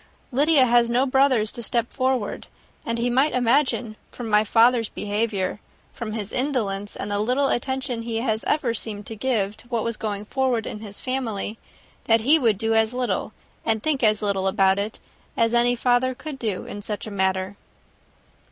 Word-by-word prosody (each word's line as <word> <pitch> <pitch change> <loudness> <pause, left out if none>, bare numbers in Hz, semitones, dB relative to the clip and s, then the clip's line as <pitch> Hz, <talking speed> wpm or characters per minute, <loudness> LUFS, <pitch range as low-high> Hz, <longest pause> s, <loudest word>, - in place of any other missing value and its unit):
Lydia 285 +1 +4
has 240 -1 +4
no 245 +3 +2
brothers 260 -5 +3
to 235 - -8
step 235 0 -1
forward; 255 -5 -1 0.4
and 230 0 -1
he 235 +1 0
might 265 +5 +2
imagine, 245 -2 +1
from 240 - -7
my 210 0 +5
father's 230 +1 +3
behaviour, 205 -2 -2 0.3
from 230 -4 -5
his 215 -2 -4
indolence 210 -7 -1
and 205 - -5
the 205 - 0
little 255 +6 +1
attention 260 -1 -2
he 230 0 -4
has 225 -2 -1
ever 270 -6 +1
seemed 210 -2 -5
to 225 - -7
give 215 -4 0
to 230 - -12
what 235 -2 -1
was 230 -1 -2
going 210 -1 -3
forward 255 -2 0
in 210 - -5
his 205 -2 -7
family, 225 -5 -3 0.5
that 225 0 +4
he 295 +8 +5
would 225 -7 +2
do 225 +2 0
as 225 +2 +2
little 240 -6 -1 0.3
and 220 -1 0
think 300 -4 +1
as 215 -2 +3
little 195 -2 0
about 190 0 +3
it, 210 +2 -3 0.4
as 230 0 +2
any 240 +1 +3
father 250 +1 +2
could 275 +1 -7
do, 215 -6 -2
in 205 - -7
such 205 0 -5
a 215 - -7
matter." 190 0 -1
230 Hz, 185 wpm, -24 LUFS, 210-255 Hz, 0.5 s, my